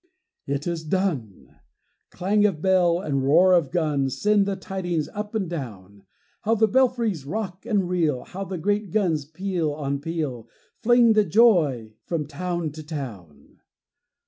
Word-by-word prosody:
It 140 +1 -2
is 170 -2 -3
done! 155 - -3 0.5
Clang 205 +4 +1
of 180 -7 -3
bell 180 -1 +3
and 140 -7 -1
roar 170 +7 +5
of 170 -6 +3
gun 150 -6 0
Send 205 +7 +2
the 200 - -1
tidings 180 -4 -3
up 210 +1 -6
and 200 -4 -1
down. 100 - -8 0.4
How 225 +2 +1
the 220 0 +3
belfries 235 - +1
rock 190 +5 -5
and 205 -6 +1
reel! 160 -8 0
How 195 +2 -7
the 190 -1 -5
great 205 +4 -1
guns, 165 -7 0
peal 165 0 -2
on 140 -1 -3
peal, 145 -7 -4 0.3
Fling 240 -1 +5
the 215 -1 +4
joy 160 - +3
from 160 +1 -2
town 170 +2 -3
to 155 +2 -9
town! 120 - -8
170 Hz, 150 wpm, -24 LUFS, 145-200 Hz, 0.5 s, roar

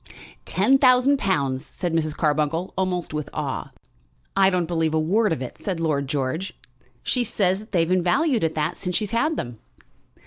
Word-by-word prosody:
"Ten 270 0 +3
thousand 255 +1 +5
pounds," 140 -8 0
said 175 +1 -4
Mrs. 155 -2 0
Carbuncle, 155 +3 0
almost 180 -3 -2
with 150 -2 -3
awe. - - -3 0.7
"I 195 -1 +5
don't 180 -2 0
believe 160 -2 0
a - - +3
word 200 +6 +2
of 135 -5 -1
it," 125 - -8
said 185 -4 -3
Lord 150 -4 0
George. 145 +7 -2 0.5
"She 250 - +2
says 190 -4 +1
that 215 +2 -13
they've 165 -3 +2
been 185 +1 +2
valued 255 - +2
at 160 -1 0
that, 155 +2 -1
since 180 -2 -3
she's 210 0 -1
had 300 +8 +1
them." 120 -2 -5
175 Hz, 180 wpm, -23 LUFS, 155-205 Hz, 0.7 s, thousand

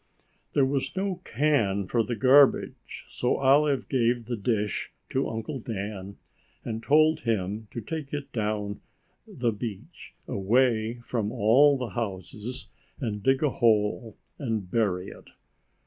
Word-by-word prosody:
There 140 - +4
was 135 +4 -2
no 190 -2 -2
can 110 -8 +1
for 115 - +1
the 115 +2 -2
garbage, 135 +5 +3
so 125 - 0
Olive 140 +1 +3
gave 120 -2 +1
the 120 - -3
dish 105 -1 -1 0.2
to 135 - 0
Uncle 115 +5 -4
Dan 100 -3 -6 0.5
and 110 -1 -4
told 155 +4 +4
him 105 -1 -2
to 120 - -6
take 150 +4 -5
it 145 -1 -5
down 105 -2 -2 0.5
the 120 -2 -1
beach 115 - -8
away 115 +2 +2
from 115 -3 -2
all 130 +6 +5
the 125 -3 -4
houses 110 +3 -5 0.3
and 105 -5 -3
dig 135 +6 +2
a 145 - +2
hole 110 -1 +1 0.2
and 110 -9 -3
bury 95 -5 0
it. - - -13
115 Hz, 135 wpm, -27 LUFS, 105-135 Hz, 0.5 s, all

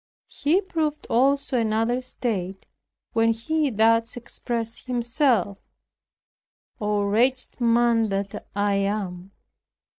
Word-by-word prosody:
He 310 +7 +1
proved 315 -5 -2
also 270 +1 +2
another 225 +3 +1
state 195 -7 -4 0.5
when 230 0 +3
he 295 +6 0
thus 230 +1 +2
expressed 235 -1 -5
himself, 240 - +1 1.2
"Oh, 210 -1 0
wretched 245 +6 +1
man 235 -1 +3
that 195 0 -4
I 205 0 +1
am! 195 -2 -2
230 Hz, 95 wpm, -24 LUFS, 205-255 Hz, 1.2 s, when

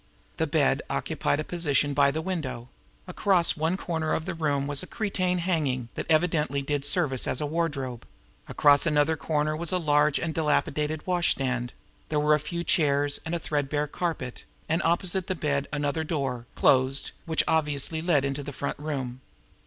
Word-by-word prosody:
The - - +1
bed - - +2
occupied 145 - -1
a - - -1
position 145 -4 +1
by 140 0 +4
the 160 +3 -2
window; 130 -10 -4 0.4
across 180 -1 +2
one 160 +4 0
corner 160 -4 -1
of 160 - -3
the 190 - -3
room 145 -4 0
was 145 0 -2
a 185 - -9
cretonne 185 -4 -1
hanging, 150 -9 -1
that - - -5
evidently 155 -4 +2
did 145 0 -2
service 145 -8 +1
as - - -1
a 150 - -1
wardrobe; 145 -6 -3 0.4
across 145 +2 +4
another 150 +1 +3
corner 155 0 -1
was 165 +1 -2
a 185 - +2
large 150 -3 +3
and 160 -1 -2
dilapidated 150 0 0
washstand; 135 -9 0 0.4
there 150 - +1
were 150 +1 +4
a 150 - +3
few 170 +3 -4
chairs, 145 -4 +2
and 165 - -1
a - - +2
threadbare 145 -1 -1
carpet; 150 -5 -4 0.2
and, 165 +2 +1
opposite 175 +3 +1
the 185 - -1
bed, 140 -3 -1
another 150 +1 -1
door, 135 -7 -3
closed, 130 +1 +3 0.2
which 160 -1 +2
obviously 155 0 +1
led 160 -5 +2
into 140 +1 -2
the 145 - -6
front 140 +1 -4
room. 135 -4 -4
150 Hz, 175 wpm, -27 LUFS, 140-165 Hz, 0.4 s, by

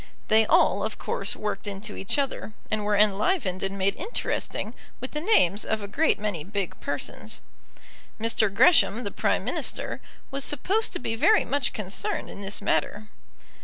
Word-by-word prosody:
They 220 0 +5
all, 200 +1 +4
of 220 - -3
course, 195 - -2
worked 210 -1 -4
into 205 +1 -5
each 195 - -1
other, 275 -6 -2 0.2
and 215 -1 0
were 205 0 +1
enlivened 205 - +2
and 195 +1 -2
made 195 +1 +1
interesting 415 +9 -3 0.3
with 255 - -6
the 300 - -3
names 215 - +3
of 220 -1 -2
a - - -4
great 310 +10 +2
many 205 -7 -3
big 200 0 -3
persons. - - -4 0.8
Mr. 220 -2 +1
Gresham, 240 - +5
the 200 - -3
Prime - - 0
Minister, - - -2 0.3
was 275 0 +1
supposed 390 - +1
to - - -2
be 225 - -2
very 430 - +4
much 280 -1 0
concerned 195 -2 -2
in 200 - -8
this 200 +1 -4
matter. 210 +1 0
210 Hz, 165 wpm, -26 LUFS, 200-265 Hz, 0.8 s, They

